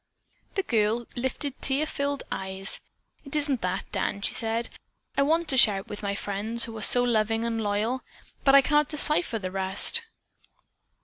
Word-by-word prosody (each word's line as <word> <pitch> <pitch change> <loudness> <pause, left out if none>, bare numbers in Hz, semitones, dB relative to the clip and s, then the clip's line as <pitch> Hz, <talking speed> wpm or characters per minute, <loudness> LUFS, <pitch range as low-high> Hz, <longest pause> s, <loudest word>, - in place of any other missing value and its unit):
The 390 - 0
girl 225 - 0
lifted 260 +2 -3
tear 280 +3 +1
filled 285 -2 -3
eyes. 190 +1 -1 0.4
"It 275 0 -4
isn't 285 -4 0
that, 185 +1 -2
Dan," 200 0 -2
she - - +2
said. 225 0 -1 0.5
"I - - +2
want 325 +4 +1
to 265 - +6
share 210 -4 +6
it 195 +3 -8
with 205 - -7
my 200 -1 -2
friends 215 +4 -1
who 225 -1 -3
are 220 - -7
so 245 +3 +5
loving 225 -1 0
and 230 -1 -2
loyal, 215 +5 -1 0.4
but 275 0 +5
I 275 - +9
cannot 295 0 +2
decipher 300 -4 +3
the 185 -3 -5
rest." 190 - +2
230 Hz, 175 wpm, -26 LUFS, 205-275 Hz, 0.5 s, I